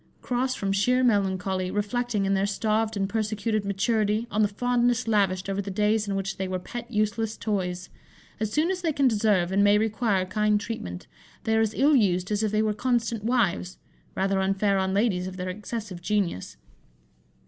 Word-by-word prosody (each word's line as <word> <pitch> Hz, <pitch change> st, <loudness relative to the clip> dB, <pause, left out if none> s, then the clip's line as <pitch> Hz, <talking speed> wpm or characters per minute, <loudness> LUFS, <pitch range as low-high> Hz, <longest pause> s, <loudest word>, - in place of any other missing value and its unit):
Cross 255 Hz, +1 st, -1 dB
from 195 Hz, -1 st, -2 dB
sheer 250 Hz, +6 st, +2 dB
melancholy, 190 Hz, -4 st, +1 dB
reflecting, 210 Hz, +1 st, -1 dB
in 195 Hz, -, +1 dB
their 195 Hz, +1 st, +1 dB
starved 215 Hz, +1 st, 0 dB
and 195 Hz, -1 st, 0 dB
persecuted 215 Hz, 0 st, -1 dB
maturity, 210 Hz, +2 st, 0 dB
on 210 Hz, -, +1 dB
the 210 Hz, -, +4 dB
fondness 245 Hz, +3 st, +1 dB
lavished 195 Hz, -4 st, +1 dB
over 195 Hz, 0 st, -1 dB
the 200 Hz, -, -6 dB
days 210 Hz, +2 st, +1 dB
in 200 Hz, -, -1 dB
which 195 Hz, 0 st, -3 dB
they 190 Hz, -, -2 dB
were 185 Hz, 0 st, -2 dB
pet 240 Hz, +6 st, -7 dB
useless 215 Hz, 0 st, -1 dB
toys; 180 Hz, -4 st, -3 dB, 0.5 s
as 215 Hz, -1 st, -2 dB
soon 310 Hz, -, +1 dB
as 370 Hz, -1 st, -3 dB
they 330 Hz, -2 st, +1 dB
can 280 Hz, -2 st, +2 dB
deserve 205 Hz, -6 st, +2 dB
and 200 Hz, +1 st, +3 dB
may 205 Hz, 0 st, +5 dB
require 215 Hz, -3 st, +1 dB
kind 210 Hz, +2 st, +1 dB
treatment, 90 Hz, -, -6 dB, 0.4 s
they 220 Hz, -, +1 dB
are 220 Hz, -, +3 dB
as 220 Hz, -1 st, 0 dB
ill 290 Hz, +2 st, +4 dB
used 185 Hz, -5 st, +2 dB
as 210 Hz, 0 st, +1 dB
if 215 Hz, -2 st, 0 dB
they 215 Hz, 0 st, +2 dB
were 215 Hz, -1 st, +1 dB
constant 230 Hz, -1 st, -1 dB
wives 215 Hz, -6 st, 0 dB, 0.4 s
rather 195 Hz, 0 st, +1 dB
unfair 195 Hz, +1 st, +1 dB
on 190 Hz, 0 st, 0 dB
ladies 195 Hz, -3 st, +1 dB
of 185 Hz, 0 st, -7 dB
their 180 Hz, 0 st, -3 dB
excessive 205 Hz, -1 st, -6 dB
genius. 180 Hz, -, -2 dB
210 Hz, 190 wpm, -26 LUFS, 195-225 Hz, 0.5 s, may